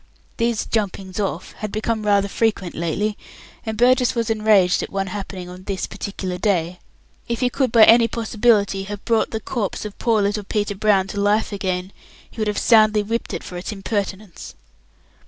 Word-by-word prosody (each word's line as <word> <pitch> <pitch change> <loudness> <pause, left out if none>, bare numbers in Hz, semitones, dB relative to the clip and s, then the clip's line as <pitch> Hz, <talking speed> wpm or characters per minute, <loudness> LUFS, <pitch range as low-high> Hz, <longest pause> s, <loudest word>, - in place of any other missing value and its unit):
These 230 -2 0
"jumpings 195 -3 -3
off" 190 -4 -3
had 215 -1 -4
become 220 0 -2
rather 200 -1 +3
frequent 200 -4 -1
lately, 200 +6 -2 0.5
and 220 -1 -3
Burgess 250 +1 +3
was 230 -1 0
enraged 215 -4 +3
at - - -5
one 195 0 -1
happening 190 -1 -6
on 180 +1 -11
this 195 -2 -2
particular 190 -2 -5
day. 180 -3 0 0.5
If 235 +1 -3
he 250 -1 +2
could 260 -2 0
by 225 -2 +7
any 230 +1 +7
possibility 215 -4 +1
have 205 0 -7
brought 230 -2 +2
the 220 - -3
corpse 220 -3 -3
of 210 - -8
poor 225 -3 +2
little 205 +1 -1
Peter 205 +1 -1
Brown 200 -1 +2
to 200 - -4
life 210 +2 +2
again, 190 -2 -3 0.4
he 225 - -7
would 215 - 0
have 210 - -1
soundly 215 -2 +4
whipped 230 +3 -3
it - - -5
for 180 - -7
its 180 - -5
impertinence. 200 -2 -4
205 Hz, 180 wpm, -21 LUFS, 195-220 Hz, 0.5 s, by